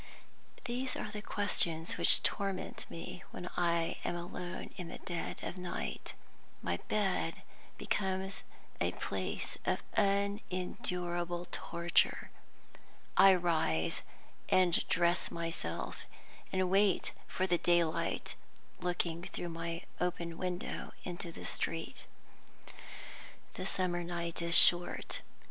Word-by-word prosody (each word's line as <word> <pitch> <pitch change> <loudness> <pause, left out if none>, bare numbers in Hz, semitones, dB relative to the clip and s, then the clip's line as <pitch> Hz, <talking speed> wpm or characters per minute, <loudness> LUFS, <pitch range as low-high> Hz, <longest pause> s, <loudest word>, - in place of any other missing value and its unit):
These 255 +2 -1
are 210 - -4
the 210 -1 -5
questions 170 -6 +1
which - - +7
torment 195 -2 -1
me 170 +2 -7
when 180 - -7
I 170 -1 +1
am - - -1
alone 175 +1 -5
in 180 -3 -5
the - - -7
dead 175 -2 -4
of 185 - -4
night. 180 -1 -4 0.5
My 85 0 0
bed 205 -3 0 0.3
becomes 190 0 -1 0.4
a - - +1
place - - -3
of - - 0
unendurable 180 -3 0
torture. 170 0 +1 0.8
I 195 -1 +9
rise 160 - +1 0.5
and 180 -2 +5
dress 175 0 +3
myself, 165 - -2 0.5
and 185 -1 +1
wait 195 -1 +3
for 185 - 0
the 175 -2 +2
daylight, 170 -2 +2 0.5
looking 175 -1 -1
through 175 - -4
my 165 0 -4 0.2
open 170 -2 -1
window 180 -1 -3
into 175 -1 -4
the - - -9
street. 165 0 -3 1.5
The - - -3
summer 175 -2 +1
night 170 -1 -3
is 170 -1 +8
short. 175 0 +5
175 Hz, 110 wpm, -34 LUFS, 170-185 Hz, 1.5 s, I